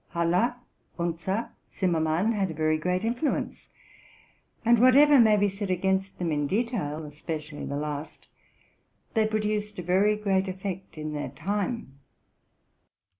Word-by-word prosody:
Haller, 175 +8 +2 0.4
Unzer, 175 +5 -2 0.2
Zimmerman, 170 +2 +1
had 200 -4 0
a 160 - -6
very 155 0 +2
great 180 +5 -1
influence; 245 +6 -2 1.0
and 235 0 +5
whatever 275 +3 +7
may 220 -3 +6
be 205 0 +3
said 195 0 -4
against 190 +1 0
them 170 -2 -1
in 145 -1 0
detail, 190 - -2
especially 150 0 -6
the 140 - -3
last, 150 +1 -5 0.9
they 220 -2 +3
produced 210 -1 -2
a 180 - -4
very 195 +4 +3
great 195 -2 0
effect 190 -1 -6
in 155 0 -4
their 145 - -3
time. 200 - -3
190 Hz, 130 wpm, -27 LUFS, 160-210 Hz, 1.0 s, whatever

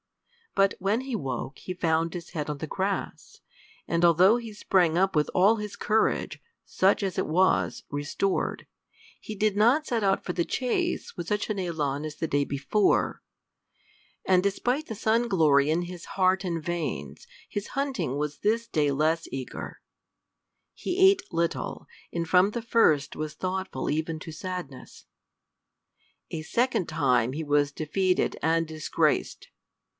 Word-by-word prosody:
But 195 0 +4
when 200 +5 +1
he 260 -2 -4
woke 135 - -4
he 185 - -5
found 165 -2 0
his 175 -1 -7
head 150 -3 -4
on 150 - -3
the 160 - -5
grass, 195 +4 -3 0.5
and 170 +1 0
although 175 +5 +6
he 230 -2 -7
sprang 180 -5 +2
up 190 0 +2
with 150 -1 +2
all 200 +5 +4
his 210 -1 -6
courage, 220 +1 0 0.2
such 195 +2 +2
as 190 -3 -2
it - - -1
was, 185 +5 +2
restored, 145 +7 -2 0.6
he 215 - -6
did 210 0 +1
not 240 +9 +4
set 235 -6 -1
out 195 -1 +1
for 180 - -2
the 175 - +1
chase 310 - -2
with 175 -1 -6
such 210 +2 -1
an - - -1
élan 150 -6 -2
as 155 -1 -6
the 160 - -3
day 145 -1 +1
before; 140 +10 +1 1.0
and 185 -1 +4
despite 245 +9 0
the 225 - -5
sun 225 +3 +1
glory 150 -6 +4
in 165 +3 +1
his 175 -1 -8
heart 190 0 +3
and 170 -3 -3
veins, 175 - -4 0.2
his 205 -1 -4
hunting 270 - -2
was 150 0 -3
this 230 +3 0
day 150 -8 +1
less 155 +4 +1
eager; 130 -2 -6 0.9
he 365 +1 -3
ate 390 0 -1
little, 170 0 -2 0.3
and 170 -1 -2
from 185 +4 +4
the 235 - -3
first 155 - +3
was 155 0 -5
thoughtful 185 -7 -3
even 160 +1 -2
to 160 - -8
sadness. 175 -5 -7 1.3
A 160 - -3
second 235 +2 0
time 130 -6 +2
he 160 +3 -3
was 145 -1 +2
defeated 180 +5 0
and 165 +1 +1
disgraced! 155 -1 -1
180 Hz, 155 wpm, -27 LUFS, 155-205 Hz, 1.3 s, although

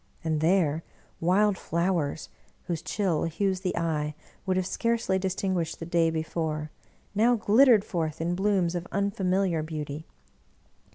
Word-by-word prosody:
And, 160 -2 0
there, 165 -2 +2 0.4
wild 190 +3 +3
flow 170 +2 0
ers, 145 +1 -4 0.3
whose 170 -3 -3
chill 180 -2 0
hues 185 +3 0
the 185 -1 -2
eye 150 -3 -1 0.3
would 185 0 +2
have 185 - +1
scarcely 230 -2 0
distin 190 0 -1
guished 170 -3 -2
the 165 - -6
day 170 -1 +2
before, 160 -1 -3 0.4
now 230 +4 +4
glittered 225 0 +5
forth 160 -3 -2
in 170 +2 0
blooms 190 -2 +1
of 175 0 -4
unfamiliar 190 -3 +1
beauty. 155 -1 -5
175 Hz, 145 wpm, -27 LUFS, 160-195 Hz, 0.4 s, glittered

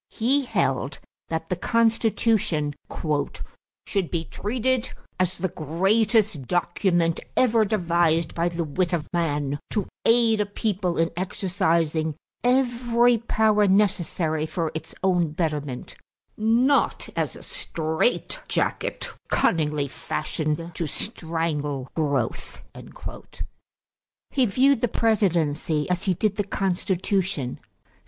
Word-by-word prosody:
He 265 +5 +1
held - - 0 0.3
that 160 0 -3
the 180 - +1
Constitution 220 -7 +1 1.1
"should 195 -5 -1
be 165 -2 -2
treated 250 +6 -1 0.3
as 185 0 +1
the 185 +1 -1
greatest 195 - +1
document 175 -1 +1 0.2
ever 230 -3 +4
devised 170 -5 +1
by 170 +1 +1
the 170 0 -2
wit 175 +4 -1
of 160 -3 0
man 145 -4 0
to 205 -3 -1 0.2
aid 230 -2 +4
a 205 - -1
people 200 -4 -1
in 165 0 +2
exercising 170 -4 0 0.3
every 245 -2 +3
power 215 -2 +3
necessary 175 -5 +1
for 165 -1 -2
its 160 0 -7
own 175 -5 +2
betterment, 150 -6 -3 0.4
not 235 +6 +2
as - - -1
a - - -11
strait 160 - -1
jacket - - -1 0.2
cunningly 150 -3 +1
fashioned 155 +4 -3
to 165 0 -3
strangle 155 - -2
growth." 140 -7 -2 1.7
He 260 -3 +3
viewed 260 +4 +3
the 245 - +3
presidency 165 -9 +1
as 180 +1 0
he 185 -2 +2
did 205 +2 0
the 205 - +1
Constitution. 190 -5 -1
180 Hz, 110 wpm, -25 LUFS, 160-220 Hz, 1.7 s, ever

